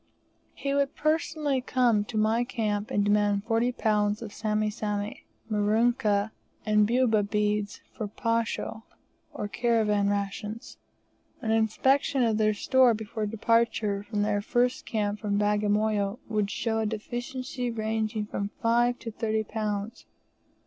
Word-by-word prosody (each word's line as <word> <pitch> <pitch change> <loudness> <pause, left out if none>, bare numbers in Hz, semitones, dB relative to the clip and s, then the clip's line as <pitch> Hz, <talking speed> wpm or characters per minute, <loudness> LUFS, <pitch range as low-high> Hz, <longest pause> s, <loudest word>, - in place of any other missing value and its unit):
He 275 0 -2
would 280 0 +1
personally 305 -3 0
come 240 -5 +2
to 220 - -5
my 220 +2 +2
camp 215 -4 -2
and 205 0 +1
demand 205 -1 +2
40 230 +2 +1
lbs. 210 -1 +1
of 210 -3 -8
Sami 215 0 0
Sami, 210 0 -4 0.2
Merikani, 215 0 +2 0.3
and 210 -1 +4
Bubu 235 -2 +3
beads 210 -1 0
for 215 - -3
posho, 230 +1 -2 0.5
or 210 - -4
caravan 210 -2 +1
rations; 205 +2 -4 0.6
an 220 - -2
inspection 260 +5 +2
of 220 -2 +1
their 215 -1 +3
store 255 +2 +4
before 215 0 -4
departure 225 -2 +1
from 205 0 -2
their 205 -1 +1
first 245 +4 0
camp 210 -2 -1
from 205 -2 -1
Bagamoyo 210 0 +1
would 210 -2 0
show 225 +1 -1
a 220 - 0
deficiency 245 +3 -4
ranging 220 -1 -2
from 200 -1 -3
5 240 +1 +3
to 230 - -7
30 220 0 -1
lbs. 215 0 -4
215 Hz, 135 wpm, -27 LUFS, 210-235 Hz, 0.6 s, and